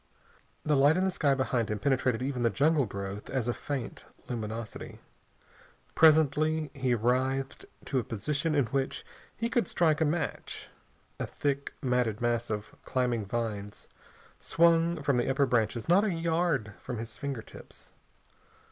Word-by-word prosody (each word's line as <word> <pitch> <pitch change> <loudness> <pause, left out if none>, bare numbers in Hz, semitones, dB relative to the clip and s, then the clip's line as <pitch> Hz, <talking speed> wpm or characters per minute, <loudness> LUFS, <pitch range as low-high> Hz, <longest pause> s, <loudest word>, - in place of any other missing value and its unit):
The 150 - +3
light 145 +4 +5
in 185 - +2
the 190 - +1
sky 145 -6 +2
behind 125 -4 0
him 105 - -1
penetrated 130 0 +1
even 130 -2 -2
the 115 - +3
jungle 145 +4 +2
growth 100 +1 -6
as 130 -3 -1
a 120 - +1
faint 135 -3 -5 0.2
luminosity. 110 -2 -5 1.0
Presently 155 -1 +4
he 130 -3 +1
writhed 130 +4 0 0.2
to 135 - 0
a - - -2
position 145 +9 -1
in 140 -3 +3
which 135 +3 -2 0.3
he 230 - 0
could 235 -5 +1
strike 160 -2 +2
a - - +5
match. 155 +3 -3 0.5
A - - -2
thick, 140 -1 -2
matted 125 -4 +1
mass 120 0 0
of 105 -1 -4
climbing 120 -5 -1
vines 105 -2 -4 0.5
swung 165 -1 +3
from 140 -2 +2
the 120 - +1
upper 135 +1 +3
branches 115 -2 0
not 180 +4 +5
a 215 - +1
yard 165 - 0
from 120 - -5
his 115 +1 -6
fingertips. 135 -5 -8
130 Hz, 150 wpm, -29 LUFS, 115-155 Hz, 1.0 s, light